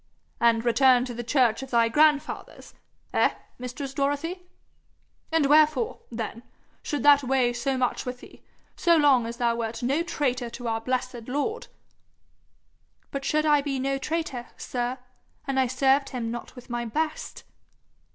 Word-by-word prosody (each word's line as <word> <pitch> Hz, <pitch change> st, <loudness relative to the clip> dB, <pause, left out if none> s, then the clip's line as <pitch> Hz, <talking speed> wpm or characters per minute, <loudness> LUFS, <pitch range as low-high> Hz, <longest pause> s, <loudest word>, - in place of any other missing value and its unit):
'And 230 Hz, 0 st, +3 dB
returned 250 Hz, +1 st, +4 dB
to 250 Hz, -, -6 dB
the 240 Hz, +1 st, -5 dB
church 240 Hz, -1 st, +2 dB
of 265 Hz, -, -7 dB
thy 235 Hz, -2 st, +3 dB
grandfathers 300 Hz, +3 st, +1 dB, 0.4 s
eh, -, -, +3 dB, 0.2 s
mistress 250 Hz, +2 st, -6 dB
Dorothy? 290 Hz, +7 st, -2 dB, 0.8 s
And 320 Hz, -3 st, +3 dB
wherefore, 295 Hz, -4 st, +3 dB
then, 230 Hz, 0 st, -5 dB, 0.4 s
should 290 Hz, -4 st, -3 dB
that 285 Hz, -1 st, +6 dB
weigh 255 Hz, -2 st, +2 dB
so 260 Hz, +2 st, -1 dB
much 250 Hz, -1 st, 0 dB
with 250 Hz, -1 st, -6 dB
thee, -, -, -15 dB, 0.3 s
so 340 Hz, -1 st, +4 dB
long 270 Hz, -6 st, +4 dB
as 235 Hz, +1 st, -6 dB
thou 235 Hz, -1 st, +1 dB
wert 230 Hz, 0 st, -4 dB
no 275 Hz, +6 st, +1 dB
traitor 255 Hz, -8 st, -1 dB
to 240 Hz, +1 st, -7 dB
our 225 Hz, 0 st, -1 dB
blessed 250 Hz, -1 st, -3 dB
Lord?' 290 Hz, -, -2 dB, 1.4 s
'But 275 Hz, -1 st, -4 dB
should 305 Hz, +2 st, +1 dB
I 295 Hz, -1 st, +4 dB
be 275 Hz, -1 st, -2 dB
no 270 Hz, +1 st, -1 dB
traitor, 290 Hz, -5 st, -3 dB
sir, 245 Hz, +1 st, -3 dB, 0.5 s
an' 270 Hz, -1 st, 0 dB
I 260 Hz, -, +3 dB
served 270 Hz, +2 st, +2 dB
him 235 Hz, -3 st, -4 dB
not 240 Hz, +2 st, -7 dB
with 250 Hz, -, -12 dB
my 240 Hz, -1 st, -3 dB
best?' 310 Hz, +7 st, -3 dB
260 Hz, 155 wpm, -26 LUFS, 240-285 Hz, 1.4 s, that